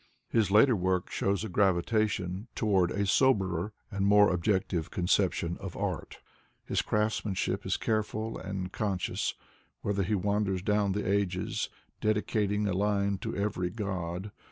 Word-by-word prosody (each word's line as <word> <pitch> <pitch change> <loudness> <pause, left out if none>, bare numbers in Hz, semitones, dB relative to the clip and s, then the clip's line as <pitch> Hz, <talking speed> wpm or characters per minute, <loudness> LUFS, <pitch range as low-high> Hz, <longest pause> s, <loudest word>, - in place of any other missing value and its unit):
His 110 -4 +2
later 110 +5 +6
work 90 -1 0
dhows 100 +1 0
a - - -3
gravitation 95 +1 +1
to - - -2
ward 95 -4 +3
a 100 +2 -1
soberer 95 -5 +2 0.2
and 100 0 -1
more 105 0 +6
objective 90 -2 0
conception 90 -1 +1
of 100 -3 -7
art. - - -3 0.5
Hii - - +1
craftsmanship 105 -2 0
19 - - 0
careful 110 0 -1
and 95 -1 -4
conscious, 95 -3 -1 0.5
whether 100 -1 0
he 95 +3 +1
wander* 100 0 0
down 100 +1 +1
the 105 - -2
ages, 95 -2 0 0.3
dedicating 105 -1 +1
a 100 - 0
line 100 0 +1
to - - -4
every 100 -3 -1
god. 95 -1 -4
100 Hz, 140 wpm, -30 LUFS, 95-105 Hz, 0.5 s, later